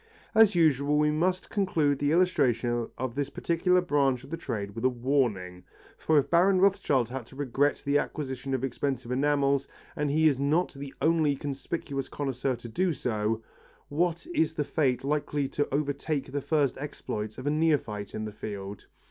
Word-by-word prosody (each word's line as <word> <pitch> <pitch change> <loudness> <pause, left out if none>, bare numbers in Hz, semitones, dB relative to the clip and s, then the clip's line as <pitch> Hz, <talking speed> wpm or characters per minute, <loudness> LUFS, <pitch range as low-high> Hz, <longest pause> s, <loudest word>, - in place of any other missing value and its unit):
As 220 -3 +6
usual 150 -3 +3
we 150 0 +3
must 180 +4 0
conclude 160 -9 +1
the 145 0 +1
illustration 120 -9 +2
of 130 -1 -3
this 140 +1 -2
particular 180 +5 +1
branch 140 -7 +1
of - - -13
the - - -1
trade 100 -11 -4
with 115 +2 -6
a 130 - +5
warning, 120 -8 -1 0.3
for 155 - +2
if 140 -1 +3
Baron 185 +5 +4
Rothschild 145 - +2
had 130 -2 -6
to - - -15
regret 145 +1 0
the 140 +1 +3
acquisition 135 -2 -3
of 130 - -3
expensive 130 -1 -2
enamels, 140 0 +2 0.3
and 145 0 -1
he 155 +2 +4
is 140 -4 +2
not 155 +6 +1
the 140 -1 -7
only 155 -3 +3
conspicuous 140 0 -4
connoisseur 135 -2 -2
to 120 0 -10
do 175 +9 0
so, 115 -3 -1 0.5
what 170 +3 0
is 160 -1 +1
the 150 - 0
fate 135 -6 0
likely 145 0 -1
to 145 - -2
overtake 145 0 -1
the 145 +1 -2
first 140 -2 +1
exploits 110 -7 -5
of 130 - -7
a 145 - +2
neophyte 145 -10 0
in 110 - -3
the 105 - -5
field! 100 -1 -7
140 Hz, 175 wpm, -28 LUFS, 125-155 Hz, 0.5 s, As